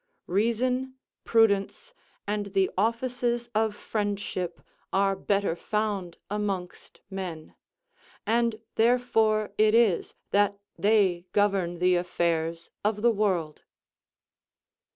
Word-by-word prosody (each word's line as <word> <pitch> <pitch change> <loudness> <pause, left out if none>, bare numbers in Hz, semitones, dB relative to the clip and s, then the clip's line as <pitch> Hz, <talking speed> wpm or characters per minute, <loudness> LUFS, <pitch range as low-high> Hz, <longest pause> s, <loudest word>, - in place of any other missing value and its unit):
Reason, 250 +6 0 0.3
prudence, 225 - +2 0.3
and 205 0 -2
the 190 -1 +3
offices 240 +2 0
of 215 -1 +1
friendship 205 -5 -3 0.3
are 195 0 +2
better 195 -2 0
found 205 -3 -2
amongst 195 -3 -4
men, 180 -5 -6 0.7
and 230 0 +1 0.2
therefore 225 -3 +2
it 215 +1 +5
is 225 -7 +2 0.2
that 200 0 +3 0.2
they 195 -4 +2
govern 195 -4 +1
the 180 +1 +3
affairs 170 -1 -1
of 210 0 0
the 235 - +6
world. 185 -8 -1
205 Hz, 95 wpm, -27 LUFS, 185-225 Hz, 0.7 s, the